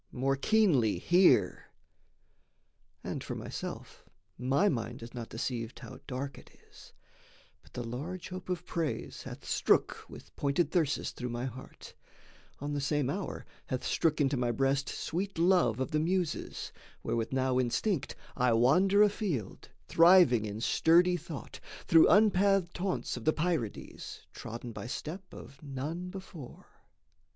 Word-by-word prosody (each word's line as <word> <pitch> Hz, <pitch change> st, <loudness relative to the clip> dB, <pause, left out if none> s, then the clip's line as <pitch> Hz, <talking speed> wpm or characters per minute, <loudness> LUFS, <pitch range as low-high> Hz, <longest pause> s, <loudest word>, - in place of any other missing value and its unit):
More 135 Hz, +2 st, 0 dB
keenly 145 Hz, -, +3 dB
hear! 175 Hz, -, +3 dB, 1.4 s
And -, -, -4 dB
for -, -, -5 dB
myself, -, -, -7 dB, 0.3 s
my 135 Hz, -, +2 dB
mind 120 Hz, -, -2 dB
is 115 Hz, -, -10 dB
not 120 Hz, -2 st, -6 dB
deceived 115 Hz, 0 st, -4 dB
How -, -, -10 dB
dark 135 Hz, +1 st, -5 dB
it -, -, -17 dB, 0.2 s
is: -, -, -15 dB, 0.7 s
But -, -, -23 dB
the 125 Hz, -, -4 dB
large 150 Hz, +10 st, -6 dB
hope 185 Hz, 0 st, -8 dB
of 180 Hz, -1 st, -3 dB
praise 165 Hz, -4 st, -3 dB
Hath -, -, -9 dB
strook -, -, +1 dB
with -, -, -13 dB
pointed 145 Hz, +3 st, 0 dB
thyrsus 160 Hz, -6 st, 0 dB
through 125 Hz, -, -5 dB
my 120 Hz, +1 st, -3 dB
heart; 130 Hz, 0 st, -9 dB, 0.7 s
On 145 Hz, +1 st, -4 dB
the 145 Hz, -, -1 dB
same 140 Hz, -1 st, 0 dB
hour 195 Hz, -1 st, -5 dB, 0.2 s
hath 130 Hz, -2 st, -3 dB
strook 160 Hz, -1 st, +1 dB
into 140 Hz, -1 st, +2 dB
my 125 Hz, -1 st, 0 dB
breast 135 Hz, +3 st, 0 dB
Sweet 190 Hz, +3 st, -3 dB
love 170 Hz, -, +3 dB
of 130 Hz, -, -2 dB
the 155 Hz, -, +1 dB
Muses, 175 Hz, 0 st, -2 dB, 0.3 s
wherewith 115 Hz, -1 st, -2 dB
now 130 Hz, -1 st, +1 dB
instinct, 135 Hz, -, -1 dB, 0.2 s
I 125 Hz, -2 st, +3 dB
wander 180 Hz, -, +5 dB
afield, 195 Hz, -, -2 dB, 0.2 s
thriving 165 Hz, -, +6 dB
in 105 Hz, +1 st, -5 dB
sturdy 175 Hz, +7 st, +4 dB
thought, 160 Hz, -3 st, -8 dB, 0.3 s
Through 165 Hz, -1 st, +6 dB
unpathed 195 Hz, -3 st, +4 dB
haunts 175 Hz, -11 st, -2 dB
of 120 Hz, -, -8 dB
the 155 Hz, -, +4 dB
Pierides, 155 Hz, -, -3 dB
Trodden 120 Hz, +2 st, -7 dB
by 115 Hz, -, -7 dB
step 175 Hz, +9 st, -6 dB
of 140 Hz, -, -12 dB
none 150 Hz, +5 st, -5 dB
before. 180 Hz, -8 st, -10 dB
145 Hz, 145 wpm, -31 LUFS, 125-180 Hz, 1.4 s, thriving